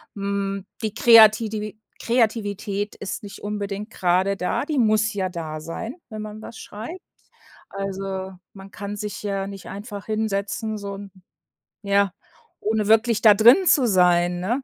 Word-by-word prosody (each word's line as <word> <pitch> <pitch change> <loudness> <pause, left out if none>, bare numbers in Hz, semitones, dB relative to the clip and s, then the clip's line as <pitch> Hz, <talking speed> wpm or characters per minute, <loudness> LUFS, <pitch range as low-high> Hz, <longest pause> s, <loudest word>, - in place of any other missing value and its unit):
Hm, 200 -1 -3 0.2
die 215 -1 -2
Kreatidi 220 -2 +5 0.2
Kreativität 210 -3 -1
ist 200 +1 -6
nicht 200 - -9
unbedingt 205 +1 -4
grade 185 0 +1
da, 180 +9 -1
die 300 -2 -2
muss 215 -2 +3
ja 190 -2 -1
da 155 -3 -6
sein, 225 - -6
wenn 215 -1 -6
man 215 0 -8
was 225 - -10
schreibt. 235 - -8 0.7
Also, 195 -1 -4 0.2
man 195 0 -12
kann 205 0 -6
sich 210 0 -5
ja 195 -1 -2
nicht 195 -2 -9
einfach 205 -1 -7
hinsetzen, 215 0 -2
so 200 -1 -6
'n 200 0 -9 0.7
ja, 200 -1 +2 0.5
ohne 215 -1 0
wirklich 225 0 +3
da 215 -2 +8
drin 245 - +6
zu 260 -6 +5
sein, 175 -2 +3
ne? 240 +8 -1
205 Hz, 150 wpm, -23 LUFS, 195-220 Hz, 0.7 s, da